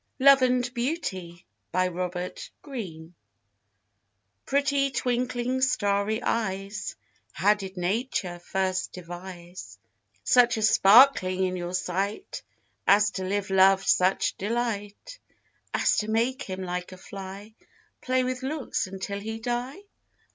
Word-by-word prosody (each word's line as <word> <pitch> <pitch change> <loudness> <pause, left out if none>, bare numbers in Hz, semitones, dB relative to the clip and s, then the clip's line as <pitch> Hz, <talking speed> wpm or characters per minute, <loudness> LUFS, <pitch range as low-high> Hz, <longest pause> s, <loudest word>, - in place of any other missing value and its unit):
Robert 270 -1 +7 0.2
Greene. 235 - -3 0.3
LOVE 180 0 -1
AND 180 +1 -5
BEAUTY. 175 - -8 1.3
Pretty 280 0 +2
twinkling 250 0 -1
starry 210 -2 +1
eyes, 200 -2 -2 0.4
How 200 +5 +4
did 195 -2 -8
Nature 180 -1 -2
first 185 +1 -2
devise 175 0 -9 0.5
Such 245 -2 +4
a 220 - -1
sparkling 200 -3 +6
in 185 0 0
your 175 0 -4
sight 195 - -3 0.5
As 205 +1 +5
to 185 -1 -4
give 200 0 -2
Love 190 0 +5
such 185 +1 +2
delight, 225 - -3 0.5
As - - +2
to 210 - -1
make 235 +4 0
him 190 0 -5
like 180 0 -4
a 185 - -10
fly, 195 +3 -9 0.5
Play 255 0 +1
with 255 0 -3
looks 275 -5 -2
until 195 +1 -5
he 220 +2 -5
die? 245 - -3
200 Hz, 115 wpm, -26 LUFS, 185-245 Hz, 1.3 s, Robert